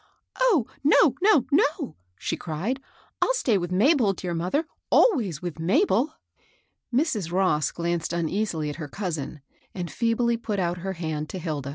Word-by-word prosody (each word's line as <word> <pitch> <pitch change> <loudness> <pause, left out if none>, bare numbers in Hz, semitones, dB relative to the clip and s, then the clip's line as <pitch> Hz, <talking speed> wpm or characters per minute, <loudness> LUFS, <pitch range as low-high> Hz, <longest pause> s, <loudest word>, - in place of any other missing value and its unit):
" - - -22
Oh, 435 - +4 0.2
no, 295 -1 +5
no, 390 - +5
no 310 - +2
I - - -26
" 90 0 -45
she - - 0
cried; 185 - -3 0.2
'' - - -34
I'll - - +3
stay 230 - +2
with 175 0 -4
Mabel, 225 - +4
dear 180 -1 -4
mother, 180 - 0
— - - -55
always 210 - +3
with 170 -3 -5
Mabel." 270 - +2 0.8
Mrs. 235 - 0
Ross 175 -5 +2
glanced 170 -1 -2
uneasily 170 -2 -1
at - - -9
her 155 -3 -5
cousin, 155 -4 -4 0.3
and 175 -3 -4
feebly 235 0 +1
put 220 -3 -3
out 175 -1 -1
her 190 +2 -3
hand 155 -3 -4
to - - -5
Hilda. 155 -6 -4
185 Hz, 180 wpm, -25 LUFS, 165-250 Hz, 0.8 s, no